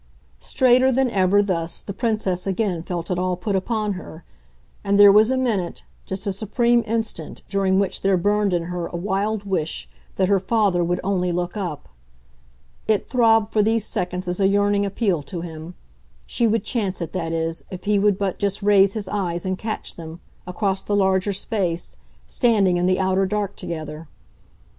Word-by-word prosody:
Straighter 255 - +3
than 260 -1 +1
ever, 195 0 +3
thus, 170 -4 -2
the 200 - -6
Princess 200 -4 -1
again 190 -3 -1
felt 170 +1 -5
it 180 - 0
all 180 0 0
put 200 +2 -2
upon 210 +1 -1
her, 175 -3 -9 0.6
and 200 0 +2
there 205 0 +9
was 215 +3 +5
a 260 - +1
minute, 215 -9 -1 0.2
just 190 +2 -4
a 200 - 0
supreme 235 +4 +1
instant, 220 -7 -3
during 195 -1 +1
which 195 -1 -1
there 195 -1 +3
burned 205 +2 +1
in 175 -2 0
her 175 0 -4
a - - -8
wild 200 +3 -1
wish 155 - -2 0.3
that 185 - +2
her 200 0 +3
father 195 -3 +1
would 175 +1 -1
only 185 -2 0
look 175 +2 -2
up. 180 -8 -5 1.0
It 215 -2 0
throbbed 225 -3 +3
for 215 - +3
these 220 0 +1
seconds 180 +1 -3
as 180 +1 -2
a 195 - +4
yearning 205 0 +2
appeal 195 -5 0
to 170 +4 -6
him 165 0 -8 0.5
she 235 - 0
would 220 -1 +1
chance 210 -4 -2
it, 170 -2 -5
that 165 -3 -2
is, 165 0 -2
if 185 - -8
he 205 0 +2
would 205 -1 +3
but 195 -2 -2
just 200 0 -1
raise 200 -1 +4
his 210 -3 -3
eyes 180 -4 -2
and 185 0 0
catch 215 +3 -5
them, 165 0 -9 0.3
across 190 +1 -1
the 205 - -1
larger 190 0 +2
space, 190 -4 -2 0.3
standing 205 -7 +2
in 175 +1 +1
the 185 0 +2
outer 190 0 +1
dark 205 0 -2
together. 155 -1 -6
195 Hz, 185 wpm, -22 LUFS, 180-210 Hz, 1.0 s, there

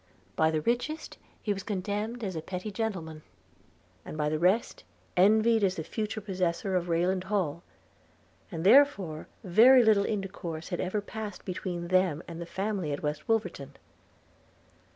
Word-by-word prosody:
By 160 - +3
the 155 -1 0
richest 245 - -2 0.2
he 210 - +1
was 195 - -6
contemned 210 +4 -3
as 190 -4 -3
a 160 - -3
petty 185 +5 -5
gentleman; 185 -8 -4 0.8
and - - -8
by 150 -1 +1
the 155 0 -1
rest 185 +7 +1 0.3
envied 220 +4 +4
as 185 -2 +2
the 160 - -4
future 215 +5 -4
possessor 185 -1 -1
of 175 -1 -1
Rayland 180 +2 +1
Hall 180 -6 -1 0.5
– - - -34
and 165 -2 -4
therefore 200 - +4 0.2
very 235 +7 +7
little 210 -3 +4
intercourse 185 -6 -4
had 175 - -3
ever 190 +3 -1
passed 210 -1 -7
between 175 -2 -4
them 185 -4 +2
and 170 0 -7
the 170 - -6
family 195 -4 -2
at 145 - -4
West 150 +7 -3
Wolverton. 145 -11 -1
190 Hz, 155 wpm, -29 LUFS, 170-215 Hz, 0.8 s, very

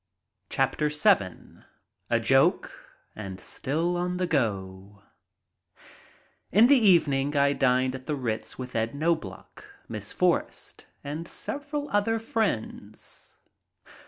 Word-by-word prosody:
I 135 - +5
LOVE 135 - -2
DOGS 150 0 -1
VII 95 -3 +1 0.5
A - - +3
JOKE - - +3 0.4
AND 95 -3 -7
STILL 165 +6 -2
ON 180 +1 -1
THE 180 - 0
GO 100 - -2 1.5
IN 215 +5 +7
the 285 +3 +7
evening 150 - +3
I 140 0 +4
dined 130 -1 +2
at 130 0 -8
the 150 - 0
Ritz 115 -5 -3
with 125 -1 -7
Ed 115 +3 -1
Knobloch, 155 - -3 0.2
Miss - - -6
Forrest, - - -1 0.2
and 150 +4 -5
several 290 +1 -4
other 205 +2 +2
friends. 200 - -4
140 Hz, 120 wpm, -27 LUFS, 115-180 Hz, 1.5 s, IN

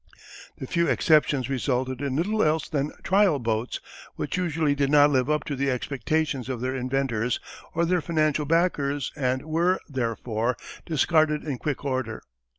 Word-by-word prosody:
The - - -6
few 170 -1 +1
exceptions 145 -5 +3
resulted 130 -1 -1
in 140 -2 -2
little 210 +8 +1
else 155 +1 +2
than 145 -1 -1
trial 190 -4 +4
boats 115 -1 -2 0.4
which - - -3
usually 165 -5 +1
did 140 -1 0
not 145 0 +6
live 130 0 +2
up 150 0 +1
to 145 - -4
the 140 +1 0
expectations 135 +1 -1
of 130 -3 -3
their 130 +2 -2
inventors 125 -2 -1 0.4
or 170 +1 +2
their 180 0 +1
financial 155 -2 +1
backers 145 -4 +1
and 130 -2 0
were, 170 +4 +1
therefore, 120 -2 -2 0.3
discarded 155 -1 +2
in 140 -5 -4
quick 145 -1 -3
order. 130 -5 -2
140 Hz, 155 wpm, -26 LUFS, 130-155 Hz, 0.4 s, not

